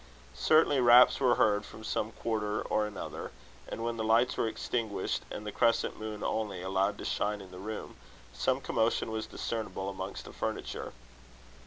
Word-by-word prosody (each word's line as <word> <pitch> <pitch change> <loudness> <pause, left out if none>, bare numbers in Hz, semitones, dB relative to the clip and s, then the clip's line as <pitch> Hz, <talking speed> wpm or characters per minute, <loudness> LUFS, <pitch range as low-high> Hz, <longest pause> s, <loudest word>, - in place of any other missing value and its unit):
Certainly, 155 - +4
raps 120 0 +7
were 125 -3 +4
heard 105 -1 +3
from 110 - -11
some 110 0 -1
quarter 105 -3 -2
or 105 0 +1
another; 105 - -6 0.4
and 115 - -5
when 115 0 -2
the 110 - -1
lights 115 +3 +3
were - - +1
extinguished, 110 -1 -2
and 105 - -6
the 105 - -3
crescent 115 +3 +1
moon 110 -1 -5
only 100 -5 -2
allowed 95 +2 +1
to - - -7
shine 105 0 0
in 95 -2 -11
the 90 - -9
room, 110 +3 -6 0.4
some - - 0
commotion 115 0 +1
was 110 0 -3
discernible 105 -4 -3
amongst 95 0 -6
the - - -10
furniture. - - -4
110 Hz, 170 wpm, -31 LUFS, 105-115 Hz, 0.4 s, raps